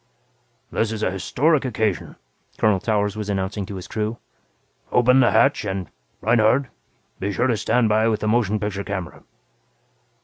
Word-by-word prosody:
"This 110 -1 0
is 110 -1 -4
an 95 - 0
historic 145 - +1
occasion," 110 - -2 0.4
Colonel 105 -3 +3
Towers 105 -1 0
was 105 -1 -5
announcing 95 0 -2
to 100 - -7
his 95 0 -7
crew. 110 +2 -3 0.7
"Open 125 +2 +4
the 125 - +5
hatch 140 -4 +3
and, 95 -4 -4 0.3
Reinhardt, 115 +4 +3 0.5
be 100 - -2
sure 115 +5 0
to 125 -3 +2
stand 120 +2 +1
by 110 +1 +3
with 110 -2 0
the 110 - -1
motion 110 -2 +1
picture 100 -1 -3
camera." 95 -4 -5
110 Hz, 160 wpm, -22 LUFS, 100-120 Hz, 0.7 s, the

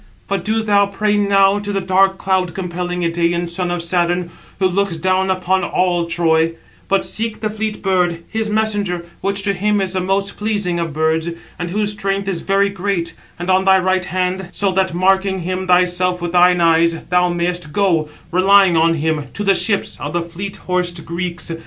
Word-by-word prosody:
But 195 -3 -2
do 220 +2 0
thou 200 -2 +3
pray 210 +1 0
now 200 -1 +3
to 205 0 -5
the 200 - 0
dark, 190 +1 +2
cloud 185 -3 -1
compelling 180 -1 -3
Idæan 170 +1 0
son 175 +1 -2
of 175 -1 -2
Saturn, 175 0 0 0.3
who 190 - +2
looks 190 -1 0
down 185 +3 0
upon 185 0 0
all 175 -2 0
Troy; 165 -1 +2 0.3
but 195 -1 +1
seek 220 0 -2
the 215 -1 -1
fleet 215 -1 -4
bird, 180 -3 0
his 220 -1 -2
messenger, 205 -5 -1 0.2
which 200 0 -1
to 200 -1 +1
him 205 +2 0
is 190 -1 -1
the 185 - -1
most 195 +2 -1
pleasing 205 -5 -1
of 165 -1 -2
birds, 160 +2 0 0.3
and 175 0 -3
whose 210 +3 0
strength 195 -1 -2
is 185 -4 -2
very 200 0 +2
great, 190 -4 -2 0.3
on 185 +2 +2
thy 190 0 +6
right 185 0 +1
hand, 185 0 -2
so 200 -1 0
that, 190 -2 0
marking 190 +1 +2
him 185 +2 -3
thyself 180 0 +2
with 175 -1 -3
thine 180 0 +4
eyes, 165 0 +3
thou 180 0 +3
mayest 175 -2 -2
go, 170 -5 +1 0.2
relying 190 0 +5
on 165 +1 +3
him, 155 -1 -1
to 205 - -3
the 195 -1 +4
ships 200 +2 -1
of 145 +1 -5
the 175 -1 0
fleet 185 +4 -6
horsed 180 -2 -1
Greeks. 170 0 -3
185 Hz, 190 wpm, -18 LUFS, 175-195 Hz, 0.3 s, thy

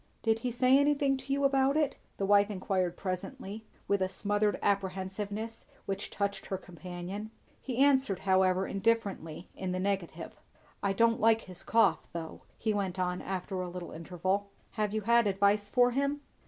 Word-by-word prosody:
"Did 225 -1 +2
he 250 - -2
say 255 +3 +4
anything 285 -1 +3
to 270 - -8
you 280 +1 +1
about 275 +1 +3
it?" 300 -3 0 0.2
the 195 - 0
wife 205 +1 +5
enquired 185 -3 -1
presently, 205 +3 -5 0.2
with 200 -1 +2
a 185 - +1
smothered 205 +2 0
apprehensiveness 200 +3 -2 0.2
which 195 - -3
touched 200 -1 -2
her 190 - -2
companion. 180 +3 -7 0.3
He 255 -3 -4
answered 265 -8 +3
however 190 0 +3
indifferently 195 -6 -1
in 185 -1 -3
the 185 - -1
negative. 195 -2 -3 0.5
"I 200 - +1
don't 230 +3 +3
like 225 0 +5
his 185 -1 -8
cough, 205 -8 +3
though," 165 -1 -6 0.2
he 220 -1 0
went 195 -3 -2
on 180 -1 -1
after 190 0 -3
a 180 - -4
little 175 0 -7
interval. 185 +4 -2 0.2
"Have 210 -2 -1
you 215 +1 -1
had 235 +1 +4
advice 200 +1 +2
for 245 +1 +4
him?" 280 +3 0
200 Hz, 170 wpm, -31 LUFS, 185-230 Hz, 0.5 s, wife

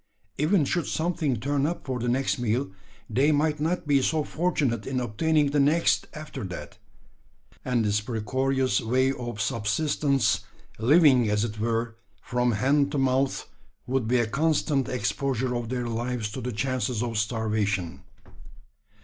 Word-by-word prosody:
Even 155 +1 +3
should 175 +4 -1
something 160 -5 0
turn 140 +3 0
up 170 - -4
for 130 -3 -3
the 120 +1 -1
next 130 +1 0
meal, 120 0 -1 0.4
they 135 +7 +2
might 150 0 +1
not 165 +4 -1
be 140 -2 +3
so 155 +3 +1
fortunate 145 -10 -1
in 130 -1 -1
obtaining 145 +6 +1
the 145 - +2
next 150 +4 +3
after 150 -4 -7
that; 90 -1 -8 0.8
and 120 -3 0
this 105 0 +1
precarious 130 +4 0
way 130 +4 +2
of 120 -5 -6
subsistence 115 0 +1 0.4
living, 130 -2 +5
as 105 0 +1
it 105 -2 -6
were, 115 0 -1 0.2
from 125 -1 0
hand 140 +6 +2
to 145 - -2
mouth 135 0 +1 0.4
would 130 -3 -1
be 125 +2 +3
a 120 - +2
constant 140 0 +1
exposure 130 +1 -1
of 120 -2 -3
their 125 -1 -2
lives 115 -1 -3
to - - -5
the 125 - -3
chances 125 0 -1
of 115 -2 -3
starvation. 105 -5 -1
130 Hz, 150 wpm, -26 LUFS, 115-145 Hz, 0.8 s, living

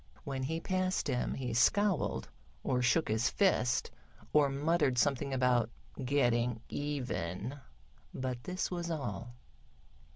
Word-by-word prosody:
When 135 -2 -3
he 160 +5 -1
passed 185 0 0
him 125 -3 0
he 125 -3 -3
scowled, 195 - +2 0.4
or 125 -1 +1
shook 125 +7 +3
his 110 +3 +2
fist, 175 - +2 0.4
or 150 -2 +5
muttered 145 -1 +1
something 140 +1 +2
about 125 -3 +2 0.3
"getting 120 -3 +2
even," 125 - -3 0.5
but 130 -2 -4
this 185 +1 -2
was 175 -1 -3
all. 120 -7 -4
130 Hz, 120 wpm, -33 LUFS, 120-155 Hz, 0.5 s, or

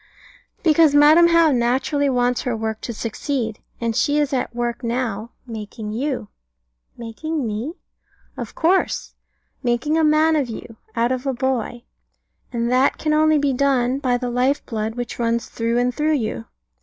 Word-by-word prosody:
Because 315 -3 +5
Madam 310 +4 +7
How 335 -2 +5
naturally 265 +4 +1
wants 245 -1 +1
her 245 -3 -2
work 220 0 -3
to - - -4
succeed, 230 0 -3 0.2
and 230 -1 -1
she 290 +5 +2
is 290 -2 +1
at 250 -2 -2
work 240 +1 -2
now 230 -2 -2 0.2
making 220 -2 -7
you. 250 -2 -3 0.7
Making 265 +6 -4
me? 225 +8 -3 0.6
Of - - -7
course. 360 +4 +1 0.5
Making 255 +6 +1
a - - +3
man 310 +1 +4
of 280 -5 0
you, 225 0 -8 0.2
out 235 +1 +1
of 260 +1 -2
a 270 - +1
boy. 245 -2 -2 0.7
And 235 0 -1
that 255 +2 +3
can 305 -1 0
only 310 0 +4
be 285 -2 +1
done 260 -1 +1
by 250 -3 +1
the 245 0 -3
life 255 +4 +1
blood 220 -1 -3
which 245 -1 -5
runs 235 0 0
through 230 +1 -1
and 245 +1 +1
through 305 +4 +1
you. 215 - -3
250 Hz, 165 wpm, -21 LUFS, 235-290 Hz, 0.7 s, Madam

